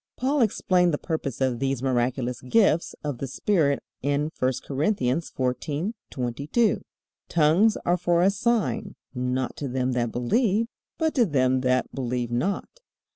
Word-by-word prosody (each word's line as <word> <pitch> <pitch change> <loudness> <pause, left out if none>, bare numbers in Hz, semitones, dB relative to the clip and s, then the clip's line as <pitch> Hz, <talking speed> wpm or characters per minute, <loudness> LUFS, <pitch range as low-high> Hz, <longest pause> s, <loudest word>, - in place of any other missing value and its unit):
Paul 270 +2 +1
explained 180 -6 +2
the - - -3
purpose 145 -6 -4
of 130 -3 +1
these 135 -1 -1
miraculous 125 -1 0
gifts 170 - +2
of 145 -5 -3
the 135 - -3
Spirit 140 0 +1 0.2
in 145 +3 0
I 130 0 +3
Corinthians 145 0 0
14:22, 145 - -1 0.5
"Tongues 170 +7 +4
are 175 +1 +3
for 175 0 +2
a 195 - +5
sign, 205 - 0 0.2
not 125 0 -2
to 145 - -3
them 130 0 -1
that 120 -2 0
believe, 210 - +1 0.3
but 320 -1 +1
to 245 -4 +4
them 130 -4 +2
that 130 0 +1
believe 125 -2 -2
not." 190 - -2
140 Hz, 140 wpm, -25 LUFS, 125-185 Hz, 0.5 s, a